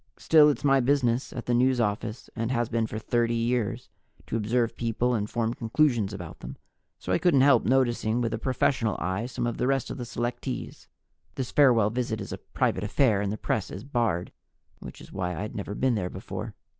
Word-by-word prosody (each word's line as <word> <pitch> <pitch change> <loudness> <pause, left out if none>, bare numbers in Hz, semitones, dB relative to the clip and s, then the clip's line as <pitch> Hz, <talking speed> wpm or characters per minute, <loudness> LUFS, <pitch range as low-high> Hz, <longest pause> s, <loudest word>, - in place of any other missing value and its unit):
Still, 155 -2 +6
it's 140 -1 -2
my 135 -1 +4
business 125 -2 +1
at 120 - -6
the 120 - 0
News 125 +1 +3
Office, 110 +1 -2
and 115 0 -2
has 120 -2 0
been 115 -1 0
for 110 - -5
30 115 +1 0
years, 120 0 -1 0.4
to - - -4
observe 115 +2 0
people 120 +1 0
and 105 -2 -1
form 115 0 -1
conclusions 120 -3 +1
about 90 -6 -8
them, - - -8 0.4
so 90 - -3
I - - +2
couldn't 155 -7 +4
help 135 -3 +5
noticing 120 -3 +2
with 115 -2 -1
a 115 - -2
professional 130 -3 +1
eye 95 +8 -2
some 120 - -3
of 120 - -2
the - - +1
rest 135 -1 0
of - - -6
the 120 - -4
selectees. 120 +1 -4 0.5
(This 130 -3 -4
farewell 120 -7 +4
visit 115 -2 -2
is - - -7
a - - -6
private - - -1
affair, 110 -1 +2
and 100 -1 -1
the 110 - -3
press 110 - -2
is 95 - -7
barred, 115 -11 -1 0.5
which - - -10
is - - -13
why 90 -2 -2
I'd 105 +7 -5
never 100 0 -4
been 130 +2 +1
there 95 -5 -1
before.) - - -7
120 Hz, 205 wpm, -27 LUFS, 110-125 Hz, 0.5 s, Still